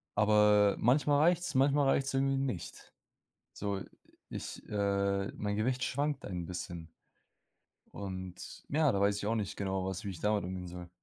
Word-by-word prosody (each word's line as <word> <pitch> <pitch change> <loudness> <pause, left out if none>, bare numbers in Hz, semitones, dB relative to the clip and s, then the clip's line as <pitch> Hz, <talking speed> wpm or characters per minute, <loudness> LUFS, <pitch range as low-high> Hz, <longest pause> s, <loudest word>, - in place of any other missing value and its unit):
aber 105 -1 +5
manchmal 145 +4 +3
reicht's, 175 0 +3
manchmal 140 +1 +4
reicht's 135 0 +1
irgendwie 135 0 +2
nicht. 125 -11 -4 0.6
So, 100 -1 -3 0.5
ich - - -6
äh, 100 -1 0
mein 105 -1 -3
Gewicht 125 +4 0
schwankt 145 +1 -1
ein 90 -3 -4
bisschen. 85 -2 -6 1.1
Und 95 -2 -7
ja, 150 -1 +3
da 100 - 0
weiß 100 0 +3
ich 100 - -4
auch 115 - +1
nicht 105 -4 -2
genau, 95 -1 -2
was 95 -1 -3
wie 100 - -4
ich 90 -4 -7
damit 105 -1 +1
umgehen 90 0 -5
soll. 90 0 -8
105 Hz, 160 wpm, -32 LUFS, 95-135 Hz, 1.1 s, aber